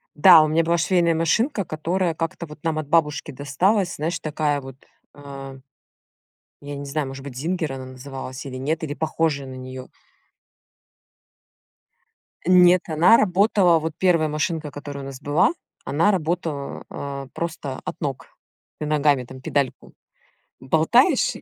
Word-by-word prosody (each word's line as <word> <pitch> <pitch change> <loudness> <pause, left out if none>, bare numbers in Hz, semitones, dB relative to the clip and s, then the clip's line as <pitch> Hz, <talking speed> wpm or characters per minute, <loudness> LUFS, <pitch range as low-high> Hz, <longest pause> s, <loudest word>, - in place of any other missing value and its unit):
Да, 165 +1 +8
у 155 - +2
меня 160 +2 +2
была 170 +1 +1
швейная 170 -1 +2
машинка, 205 - +1
которая 170 +3 -1
как-то 165 +1 -4
вот 150 -1 -12
нам 160 -2 0
от 155 - -5
бабушки 150 -1 +1
досталась, 175 - 0
знаешь, 165 +2 -2
такая 150 -1 -1
вот, 135 -1 -10 0.4
э, 135 -1 -9 1.0
я 145 0 -7
не 140 0 -6
знаю, 140 0 -2
может 135 0 -8
быть, 135 -3 -8
"Зингер" 160 0 -2
она 130 -1 -7
называлась 130 0 -8
или 130 - -7
нет, 155 +6 -2
или 145 -2 -3
похожая 155 -2 -1
на 130 - -8
неё. 130 0 -8 2.6
Н 180 0 +6
нет, 180 0 +6
она 170 +9 +6
работала, 190 -3 +3
вот 160 0 -4
1 170 -4 +2
машинка, 155 0 -2
которая 145 -1 -7
у - - -7
нас 135 -1 -8
была, 145 +4 +3 0.3
она 165 +8 +2
работала, 160 -5 -3
э, 140 -1 -6
просто 155 -5 -5
от - - -6
ног. 140 -4 -4 0.5
Ты 150 - -3
ногами 145 -3 +2
там 130 +1 -11
педальку 140 0 -2 0.7
болтаешь 165 - +3
и - - -10
155 Hz, 150 wpm, -23 LUFS, 140-170 Hz, 2.6 s, Да